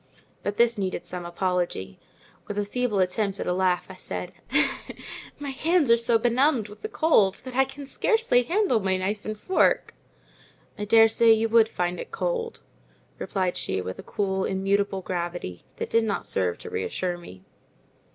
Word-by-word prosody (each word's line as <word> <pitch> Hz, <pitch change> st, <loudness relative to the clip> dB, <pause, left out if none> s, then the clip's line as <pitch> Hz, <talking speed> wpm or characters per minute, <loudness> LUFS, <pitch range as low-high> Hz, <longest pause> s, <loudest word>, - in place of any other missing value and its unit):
But 205 Hz, 0 st, -3 dB
this 235 Hz, -2 st, +3 dB
needed 185 Hz, -2 st, -2 dB
some 175 Hz, 0 st, -6 dB
apology—with 180 Hz, -, -4 dB
a 205 Hz, -, 0 dB
feeble 245 Hz, 0 st, -1 dB
attempt 195 Hz, +2 st, 0 dB
at -, -, -2 dB
a 180 Hz, -, +1 dB
laugh, 185 Hz, -1 st, +1 dB
I -, -, -9 dB
said, -, -, -5 dB, 1.1 s
"My 285 Hz, -1 st, -5 dB
hands 315 Hz, -1 st, +2 dB
are -, -, +8 dB
so 230 Hz, 0 st, +2 dB
benumbed 240 Hz, 0 st, +2 dB
with 210 Hz, -, -13 dB
the 435 Hz, -, -4 dB
cold 215 Hz, -, +3 dB
that 255 Hz, -1 st, -8 dB
I 265 Hz, +1 st, +4 dB
can 275 Hz, +1 st, -9 dB
scarcely 440 Hz, -, +2 dB
handle 345 Hz, -, +2 dB
my 190 Hz, -2 st, +1 dB
knife 200 Hz, +3 st, -3 dB
and 215 Hz, 0 st, -4 dB
fork." 375 Hz, -, +2 dB, 0.8 s
"I 210 Hz, -, -4 dB
daresay 225 Hz, +1 st, +6 dB
you 225 Hz, +1 st, +1 dB
would 225 Hz, -1 st, +5 dB
find 180 Hz, 0 st, -2 dB
it -, -, -6 dB
cold," 460 Hz, 0 st, -3 dB, 0.6 s
replied 185 Hz, -2 st, -1 dB
she 130 Hz, -8 st, -2 dB
with 95 Hz, 0 st, -5 dB
a -, -, -4 dB
cool, 190 Hz, -2 st, -1 dB
immutable 195 Hz, 0 st, 0 dB
gravity 175 Hz, -, -4 dB
that -, -, -5 dB
did 230 Hz, 0 st, +4 dB
not 205 Hz, -, -2 dB
serve 90 Hz, -2 st, 0 dB
to -, -, -9 dB
reassure 180 Hz, -1 st, -2 dB
me. 95 Hz, -, -13 dB
205 Hz, 170 wpm, -26 LUFS, 185-245 Hz, 1.1 s, are